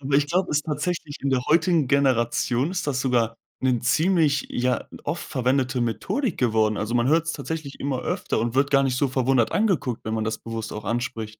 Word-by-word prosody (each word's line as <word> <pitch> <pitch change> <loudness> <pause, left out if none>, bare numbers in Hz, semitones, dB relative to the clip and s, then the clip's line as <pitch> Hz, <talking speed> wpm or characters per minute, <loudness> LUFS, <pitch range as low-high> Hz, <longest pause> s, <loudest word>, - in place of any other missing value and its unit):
Aber 140 0 -2
ich 145 0 +4
glaube, 180 +4 0
ist 150 0 +1
tatsächlich 160 -1 -3
in 140 - 0
der 130 -2 +1
heutigen 165 -1 +3
Generation 130 0 +2
ist 180 -2 -3
das 135 -3 0
sogar 120 -3 +1 0.2
'ne 130 -2 +2
ziemlich 150 +2 +2
ja, 125 +1 -1 0.2
oft 165 +4 -3
verwendete 130 -1 0
Methodik 165 - -1
geworden. 110 -3 +2
Also 110 +3 -2
man 120 +1 +2
hört's 165 +2 +2
tatsächlich 155 -4 -6
immer 135 -2 -2
öfter - - -2
und 115 +1 -2
wird 140 +2 +2
gar 140 -1 +4
nicht 130 -2 0
so 140 +2 +1
verwundert 130 -2 +1
angeguckt, 180 - 0
wenn 110 - -2
man 110 -1 -1
das 110 0 -2
bewusst 115 -1 -6
auch 105 - -6
anspricht. 115 -2 -3
130 Hz, 200 wpm, -24 LUFS, 120-150 Hz, 0.2 s, ich